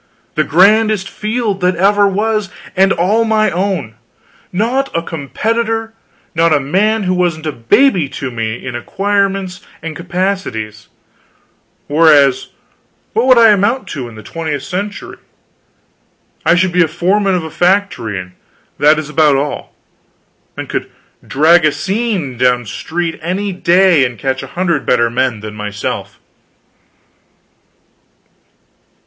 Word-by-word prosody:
The 155 Hz, -, +1 dB
grandest 205 Hz, +4 st, +3 dB
field 215 Hz, -2 st, -3 dB
that 180 Hz, 0 st, +2 dB
ever 200 Hz, +3 st, +3 dB
was; 210 Hz, +1 st, -1 dB, 0.3 s
and 195 Hz, +1 st, +4 dB
all 200 Hz, +7 st, +2 dB
my 215 Hz, -2 st, +2 dB
own; 180 Hz, -, -2 dB, 0.6 s
not 240 Hz, +8 st, 0 dB
a 165 Hz, -, -1 dB
competitor; 225 Hz, +9 st, -2 dB, 0.4 s
not 165 Hz, 0 st, +2 dB
a 150 Hz, -, +4 dB
man 200 Hz, +10 st, +1 dB
who 185 Hz, -1 st, 0 dB
wasn't 175 Hz, -3 st, -1 dB
a 155 Hz, -, -1 dB
baby 160 Hz, -, +2 dB
to 135 Hz, -2 st, -5 dB
me 115 Hz, 0 st, -4 dB
in 125 Hz, -2 st, -5 dB
acquirements 195 Hz, +5 st, -1 dB, 0.2 s
and 165 Hz, -1 st, -6 dB
capacities; 175 Hz, -, -3 dB, 1.0 s
whereas, 145 Hz, -3 st, +4 dB, 0.7 s
what 235 Hz, +3 st, +1 dB
would 255 Hz, -2 st, +6 dB
I 230 Hz, -1 st, +7 dB
amount 210 Hz, +6 st, +1 dB
to 130 Hz, -5 st, -5 dB
in 115 Hz, -, -13 dB
the 110 Hz, -, -11 dB
twentieth 155 Hz, -4 st, -4 dB
century? 200 Hz, +7 st, -5 dB, 1.3 s
I 170 Hz, -, +5 dB
should 180 Hz, +1 st, +2 dB
be 180 Hz, +1 st, +2 dB
foreman 190 Hz, +4 st, +1 dB
of 175 Hz, -, -1 dB
a 160 Hz, -, -7 dB
factory, 155 Hz, -, 0 dB, 0.5 s
that 150 Hz, +2 st, +5 dB
is 155 Hz, -1 st, -4 dB
about 150 Hz, -1 st, +3 dB
all; 140 Hz, +2 st, -3 dB, 0.8 s
and -, -, -5 dB
could -, -, -4 dB, 0.4 s
drag 165 Hz, +5 st, +4 dB
a 155 Hz, -, +4 dB
seine 195 Hz, -, -2 dB
down 125 Hz, -1 st, +2 dB
street 165 Hz, +10 st, -4 dB
any 190 Hz, +5 st, -2 dB
day 180 Hz, -3 st, +4 dB
and 120 Hz, -2 st, -2 dB
catch 130 Hz, +4 st, -2 dB
a -, -, -8 dB
hundred 180 Hz, -2 st, 0 dB
better 120 Hz, -2 st, +2 dB
men 120 Hz, -3 st, -1 dB
than 105 Hz, 0 st, -7 dB
myself. 105 Hz, -1 st, -5 dB
175 Hz, 130 wpm, -15 LUFS, 140-200 Hz, 1.3 s, I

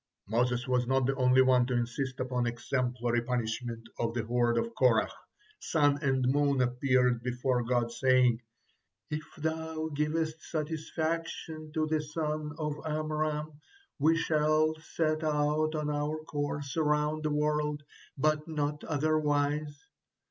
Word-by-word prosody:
Moses 120 Hz, +3 st, 0 dB
was 125 Hz, -1 st, +1 dB
not 130 Hz, 0 st, +2 dB
the 135 Hz, -, +2 dB
only 130 Hz, -1 st, +5 dB
one 125 Hz, -1 st, +4 dB
to 130 Hz, -, -1 dB
insist 125 Hz, +2 st, -2 dB
upon 125 Hz, -1 st, -1 dB
exemplary 120 Hz, 0 st, -1 dB
punishment 115 Hz, -1 st, -3 dB
of 115 Hz, 0 st, -1 dB
the 115 Hz, -2 st, -1 dB
horde 120 Hz, 0 st, +2 dB
of 230 Hz, 0 st, -1 dB
Korah. -, -, +3 dB, 0.5 s
Sun 145 Hz, -2 st, +2 dB
and 135 Hz, -3 st, +1 dB
Moon 140 Hz, 0 st, +2 dB
appeared 125 Hz, -1 st, +2 dB
before 125 Hz, +1 st, 0 dB
God, 120 Hz, -1 st, 0 dB
saying: 125 Hz, -2 st, +3 dB, 0.7 s
"If 150 Hz, +1 st, -2 dB
Thou 160 Hz, 0 st, -2 dB
givest 155 Hz, +1 st, -1 dB
satisfaction 160 Hz, 0 st, -3 dB
to 155 Hz, -1 st, +1 dB
the 155 Hz, 0 st, 0 dB
son 150 Hz, 0 st, -3 dB
of 150 Hz, -2 st, -2 dB
Amram, 155 Hz, -1 st, -2 dB, 0.4 s
we 160 Hz, +3 st, +4 dB
shall 155 Hz, -1 st, +2 dB
set 155 Hz, -1 st, -1 dB
out 155 Hz, +1 st, +1 dB
on 150 Hz, -1 st, -1 dB
our 150 Hz, +1 st, -1 dB
course 145 Hz, -1 st, -3 dB
around 150 Hz, 0 st, +1 dB
the 155 Hz, -, 0 dB
world, 150 Hz, 0 st, 0 dB, 0.3 s
but 155 Hz, +2 st, +1 dB
not 150 Hz, -2 st, -2 dB
otherwise." 145 Hz, -1 st, 0 dB
145 Hz, 135 wpm, -30 LUFS, 125-155 Hz, 0.7 s, only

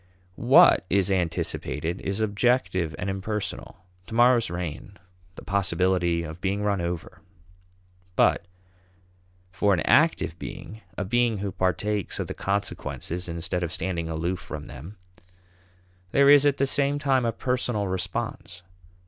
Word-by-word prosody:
What -, -, +6 dB
is 100 Hz, 0 st, +2 dB
anticipated 85 Hz, -1 st, -2 dB
is 100 Hz, +2 st, -2 dB
objective 100 Hz, -, +1 dB
and 90 Hz, -, -4 dB
impersonal; 95 Hz, 0 st, -5 dB, 0.2 s
to 115 Hz, -, -7 dB
morrow's 120 Hz, -2 st, +4 dB
rain; 85 Hz, +3 st, -6 dB, 0.4 s
the -, -, -10 dB
possibility 90 Hz, -3 st, +1 dB
of 80 Hz, +2 st, -8 dB
being 100 Hz, +1 st, -1 dB
run 100 Hz, -3 st, 0 dB
over. 85 Hz, -1 st, -5 dB, 0.9 s
But -, -, +3 dB, 1.0 s
for 100 Hz, +1 st, +2 dB
an 85 Hz, -, -2 dB
active 140 Hz, -, +2 dB
being, 110 Hz, +1 st, -8 dB, 0.2 s
a 100 Hz, -, -2 dB
being 120 Hz, +2 st, +1 dB
who 100 Hz, 0 st, -3 dB
partakes 100 Hz, +3 st, -1 dB
of -, -, -1 dB
the -, -, -6 dB
consequences 95 Hz, -3 st, -3 dB
instead 85 Hz, +2 st, -2 dB
of 85 Hz, -2 st, -2 dB
standing 85 Hz, -3 st, -2 dB
aloof 85 Hz, +3 st, -2 dB
from 75 Hz, -1 st, -8 dB
them, 85 Hz, +11 st, -10 dB, 1.2 s
there 140 Hz, 0 st, +6 dB
is 145 Hz, 0 st, +7 dB
at 140 Hz, -, +2 dB
the 140 Hz, -, +2 dB
same 140 Hz, +1 st, +1 dB
time 135 Hz, -3 st, +1 dB
a 115 Hz, -, +1 dB
personal 120 Hz, -3 st, -1 dB
response. 90 Hz, -1 st, -4 dB
95 Hz, 135 wpm, -25 LUFS, 90-110 Hz, 1.2 s, is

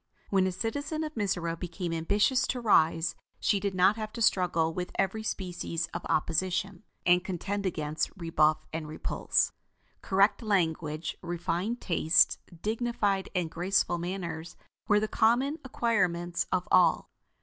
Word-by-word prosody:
When 190 Hz, -1 st, +3 dB
a -, -, -1 dB
citizen 285 Hz, -, -3 dB
of 305 Hz, 0 st, -5 dB
Mizora 180 Hz, -, -1 dB
became 175 Hz, 0 st, -4 dB
ambitious 205 Hz, +10 st, +2 dB
to 250 Hz, -, -2 dB
rise, 165 Hz, -6 st, +3 dB, 0.3 s
she 200 Hz, -, +2 dB
did 195 Hz, -1 st, -2 dB
not 190 Hz, +4 st, +4 dB
have 215 Hz, -1 st, -4 dB
to 235 Hz, -, -6 dB
struggle 170 Hz, -5 st, +2 dB
with 180 Hz, +1 st, -4 dB
every 195 Hz, +3 st, 0 dB
species 175 Hz, -5 st, -3 dB
of 170 Hz, -, -5 dB
opposition, 180 Hz, +4 st, 0 dB, 0.2 s
and 180 Hz, 0 st, +4 dB
contend 200 Hz, +2 st, -3 dB
against 155 Hz, -3 st, -2 dB
rebuff 155 Hz, -3 st, +2 dB
and 160 Hz, -1 st, -4 dB
repulse. 155 Hz, -, 0 dB, 0.5 s
Correct 200 Hz, +2 st, +3 dB
language, 165 Hz, -7 st, -1 dB
refined 175 Hz, +6 st, -2 dB
tastes, 170 Hz, -2 st, +3 dB, 0.2 s
dignified 215 Hz, -3 st, 0 dB
and 175 Hz, -3 st, -1 dB
graceful 175 Hz, 0 st, +1 dB
manners 170 Hz, -2 st, -5 dB, 0.3 s
were 205 Hz, -, +4 dB
the 215 Hz, -, -1 dB
common 255 Hz, +9 st, +2 dB
acquirements 180 Hz, -9 st, 0 dB
of 180 Hz, -1 st, 0 dB
all. -, -, +4 dB
185 Hz, 140 wpm, -29 LUFS, 170-210 Hz, 0.5 s, not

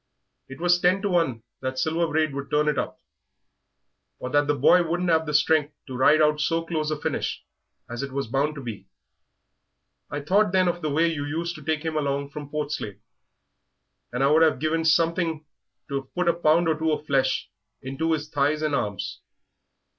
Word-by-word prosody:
It 135 Hz, -, -9 dB
was 175 Hz, +1 st, +3 dB
ten 185 Hz, +3 st, +3 dB
to 205 Hz, -, 0 dB
one 155 Hz, -11 st, 0 dB, 0.2 s
that 130 Hz, 0 st, -3 dB
Silver 160 Hz, +4 st, +1 dB
Braid 155 Hz, -2 st, 0 dB
would 140 Hz, 0 st, -5 dB
turn 150 Hz, 0 st, +2 dB
it 150 Hz, -3 st, +1 dB
up, -, -, -4 dB, 1.2 s
or 125 Hz, -, -6 dB
that 145 Hz, +1 st, +3 dB
the 145 Hz, -, +2 dB
boy 145 Hz, +6 st, +5 dB
wouldn't 175 Hz, +1 st, 0 dB
'ave 160 Hz, 0 st, +3 dB
the 150 Hz, -, -4 dB
strength 150 Hz, 0 st, +2 dB
to 130 Hz, -4 st, -7 dB
ride 150 Hz, +5 st, +5 dB
out 150 Hz, 0 st, +2 dB
so 165 Hz, +2 st, 0 dB
close 155 Hz, -2 st, -2 dB
a 155 Hz, -1 st, -2 dB
finish -, -, -3 dB, 0.4 s
as 120 Hz, +2 st, -5 dB
it 140 Hz, -1 st, -5 dB
was 135 Hz, +1 st, -2 dB
bound 140 Hz, +6 st, 0 dB
to 140 Hz, -, -7 dB
be. 105 Hz, -5 st, -7 dB, 1.2 s
I 145 Hz, 0 st, -4 dB
thought 195 Hz, +6 st, +2 dB
then 185 Hz, -1 st, +4 dB
of 175 Hz, 0 st, -1 dB
the 155 Hz, -, -1 dB
way 155 Hz, +4 st, +2 dB
you 160 Hz, -4 st, -1 dB
used 165 Hz, +4 st, -3 dB
to 155 Hz, -, -11 dB
take 155 Hz, +1 st, -1 dB
him 160 Hz, -1 st, -2 dB
along 140 Hz, -1 st, -1 dB
from 145 Hz, -1 st, -8 dB
Portslade, 145 Hz, -9 st, -4 dB, 1.1 s
and 125 Hz, +2 st, -1 dB
I'd 150 Hz, +4 st, +4 dB
have 155 Hz, -4 st, +4 dB
given 160 Hz, +3 st, 0 dB
something 165 Hz, -1 st, +1 dB, 0.4 s
to've 135 Hz, -2 st, -4 dB
put 180 Hz, -1 st, 0 dB
a 170 Hz, -, +5 dB
pound 165 Hz, 0 st, +3 dB
or 155 Hz, -1 st, +1 dB
two 160 Hz, 0 st, +1 dB
of 150 Hz, 0 st, -2 dB
flesh 135 Hz, -2 st, 0 dB, 0.3 s
into 140 Hz, +5 st, -1 dB
his 150 Hz, -1 st, -2 dB
thighs 150 Hz, +1 st, 0 dB
and 155 Hz, -1 st, 0 dB
arms. 100 Hz, -7 st, -3 dB
150 Hz, 195 wpm, -25 LUFS, 140-165 Hz, 1.2 s, boy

